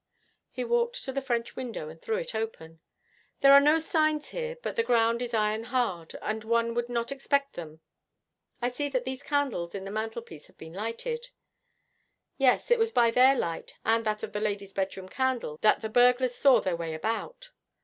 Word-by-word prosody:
He - - -4
walked 475 +1 0
to 265 - -4
the 275 +1 -2
French 235 -2 -2
window 235 -11 -5
and 160 +1 -11
threw 445 - -1
it - - -4
open. 190 -8 -5 0.6
'There 275 - +7
are 280 - +10
no 300 +3 +5
signs 310 -2 +1
here, - - -4
but - - -3
the 465 - +2
ground 235 - +2
is 245 - -3
iron 215 +1 0
hard, 230 -10 -2
and 220 0 -2
one 230 +1 +1
would 240 0 -2
not 235 0 -2
expect 280 0 0
them. 160 -2 -9 0.8
I 245 - +1
see 285 +3 -3
that 255 -2 -1
these 260 +1 -4
candles 270 -13 -1
in 195 -1 -5
the 195 - -6
mantelpiece 220 -6 -5
have - - -25
been 160 0 -11
lighted.' 470 - -4 1.1
'Yes, 270 - +3
it 480 - +5
was 455 0 +2
by 235 - +4
their 260 +3 +6
light, 170 -9 -3
and 225 +1 +3
that 215 0 -1
of 210 - -5
the 210 - -2
lady's 200 -2 -3
bedroom 190 -1 -3
candle, 250 - -2
that 215 - +4
the 220 - -2
burglars 245 +2 +4
saw 260 -2 +5
their 185 -2 -1
way 165 -1 -4
about.' 470 - -4
235 Hz, 195 wpm, -28 LUFS, 210-275 Hz, 1.1 s, are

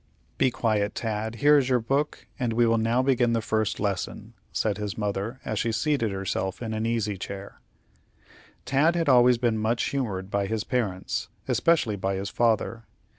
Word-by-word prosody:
"Be - - +4
quiet, 110 -4 0
Tad. 110 0 -3
Here 145 +4 +5
is 130 -2 -1
your 125 -1 +3
book, 135 +6 -1
and 120 -3 0
we 120 +1 +3
will 115 0 +3
now 115 +3 +2
begin 125 -3 +2
the 115 - +2
first 110 -1 -1
lesson," 105 +2 -3 0.2
said 105 -2 -1
his 105 -2 -4
mother, 105 +4 -2
as 110 - -2
she 115 - 0
seated 115 -1 0
herself 95 0 -2
in 110 -2 -4
an 110 +1 -1
easy 110 -4 -1
chair. 100 +1 -8 1.0
Tad 140 +7 +3
had 165 -2 0
always 125 -1 +6
been 115 -2 +1
much 115 +2 0
humored 100 -8 -3
by 100 0 0
his 110 0 -2
parents, 105 -8 -2 0.2
especially 150 -11 +2
by 95 +1 -1
his 100 +1 -4
father. 115 0 +1
115 Hz, 175 wpm, -26 LUFS, 105-125 Hz, 1.0 s, always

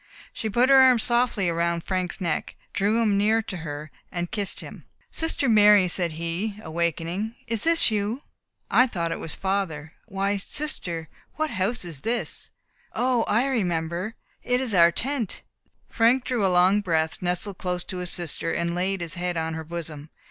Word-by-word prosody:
She 220 - -3
put 240 +5 +3
her 270 - +8
arm 260 -2 +7
softly 235 -6 +2
round 170 0 0
Frank's 185 0 -2
neck, 170 -5 -2 0.2
drew 210 +2 +2
him 205 -3 +2
near 220 +2 +3
to 195 -4 -6
her, 150 -2 -6 0.2
and 175 0 -3
kissed 205 -3 -1
him. - - -10 0.3
"Sister 325 -4 +1
Mary," 210 -3 +6
said 175 -2 -1
he, 170 +6 -3
awaking, 170 +6 -2
"is 230 -2 -1
this 330 -7 +4
you? 215 +4 -1 0.5
I 255 - +6
thought 170 -7 -2
it - - -3
was 160 - -5
father. 180 -6 -2
Why, 200 0 -1
sister 185 - -2 0.3
what 310 0 -1
house 195 +3 -1
is 165 -5 -3
this! 235 - -2 0.4
O, 245 -2 +1
I 230 +5 +2
remember, 180 -4 -1 0.3
it 250 0 +1
is 255 -5 -1
our 170 -2 +6
tent." 260 - -3 0.4
Frank 240 +3 +3
drew 245 -5 -1
a - - +4
long 185 +3 +4
breath, 160 -4 0
nestled 180 +2 -2
close 180 -1 -2
to 185 - -6
his 180 -1 -3
sister, 165 -1 -2
and 170 0 -1
laid 185 +1 -1
his 165 -2 -3
head 180 -1 -2
on 160 0 -2
her 160 0 -5
bosom. 155 -2 -7
190 Hz, 175 wpm, -25 LUFS, 170-225 Hz, 0.5 s, her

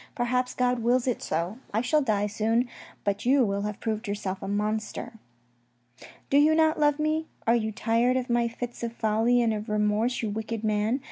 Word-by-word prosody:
Perhaps 250 0 0
God 250 -1 +1
wills 240 +2 +2
it 250 -3 -1
so. 170 +8 -2 0.2
I 220 - +3
shall 275 +5 +2
die 210 -6 +1
soon, 225 +4 0 0.4
but 200 0 -1
you 260 +1 +4
will 200 -1 -1
have 210 0 -4
proved 220 0 -3
yourself 200 -2 -3
a - - -5
monster. 215 +3 -2 0.6
" 120 +1 -21
Do 280 - +6
you 310 +2 +5
not 315 0 +3
love 295 -1 +3
me? 310 +1 0 0.2
Are 230 - +4
you 220 -2 0
tired 230 +4 +1
of 255 -1 -2
my 240 -1 +2
fits 240 +1 -6
of 235 -1 -3
folly 230 +2 +2
and 225 -1 +2
of 210 +1 -5
remorse, 210 +3 +1
you 215 - -1
wicked 220 +1 -4
man 215 +4 +1
230 Hz, 200 wpm, -27 LUFS, 210-250 Hz, 0.6 s, Do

